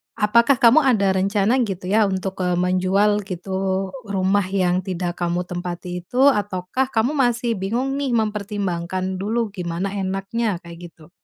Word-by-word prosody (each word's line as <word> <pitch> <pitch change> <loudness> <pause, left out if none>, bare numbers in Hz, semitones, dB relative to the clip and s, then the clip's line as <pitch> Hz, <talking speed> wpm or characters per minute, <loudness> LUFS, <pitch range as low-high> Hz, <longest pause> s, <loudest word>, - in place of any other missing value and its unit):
apakah 235 +6 +4
kamu 240 +6 +8
ada 220 -9 +3
rencana 200 +6 +1
gitu 185 -1 -5
ya 215 +1 +4
untuk, 190 0 -3
e 180 - +1
menjual 185 +3 +2
gitu, 190 +1 -2 0.2
rumah 195 0 +1
yang 185 -2 +1
tidak 175 -2 -3
kamu 175 0 -1
tempati 180 0 -5
itu, 245 - -7
ataukah 205 +4 -2 0.3
masih 240 -3 +1
bingung 235 +8 -1
nih 275 -2 -1
mempertimbangkan 190 -4 -2
dulu 220 +3 -1
gimana 180 0 -3
enaknya, 195 +3 -2
kayak 170 0 -10
gitu? 155 -1 -19
195 Hz, 140 wpm, -21 LUFS, 180-210 Hz, 0.3 s, kamu